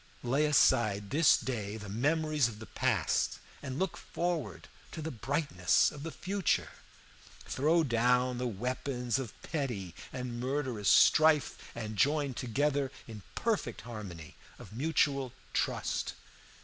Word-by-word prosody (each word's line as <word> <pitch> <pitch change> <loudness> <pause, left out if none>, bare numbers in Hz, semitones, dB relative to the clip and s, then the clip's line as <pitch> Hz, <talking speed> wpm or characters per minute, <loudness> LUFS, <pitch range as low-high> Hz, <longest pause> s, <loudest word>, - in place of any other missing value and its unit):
Lay 140 +5 +2
aside 110 -8 +3
this 155 +2 +5
day 110 -4 -4
the 105 -2 -8
memories 150 +5 +1
of 110 -3 -8
the 110 - -9
past, - - 0 0.2
and 130 -2 -5
look 190 0 -1
forward 175 -2 -3 0.3
to - - -6
the 160 +1 -4
brightness 140 +6 +1
of 145 - -9
the 165 - -4
future. 185 +7 -1 0.7
Throw 160 +5 +2
down 125 0 +2
the 125 - -1
weapons 125 +2 -2
of 125 -5 -7
petty 120 - -3 0.2
and 125 -2 -5
murderous 130 -5 -1
strife, 155 -2 +5 0.2
and 110 -2 -5
join 145 -1 +2
together 135 +3 0 0.2
in 110 -3 -8
perfect 210 - -1
harmony 100 -9 -8 0.2
of - - -12
mutual 140 -1 +1 0.2
trust. - - -1
130 Hz, 130 wpm, -31 LUFS, 115-150 Hz, 0.7 s, this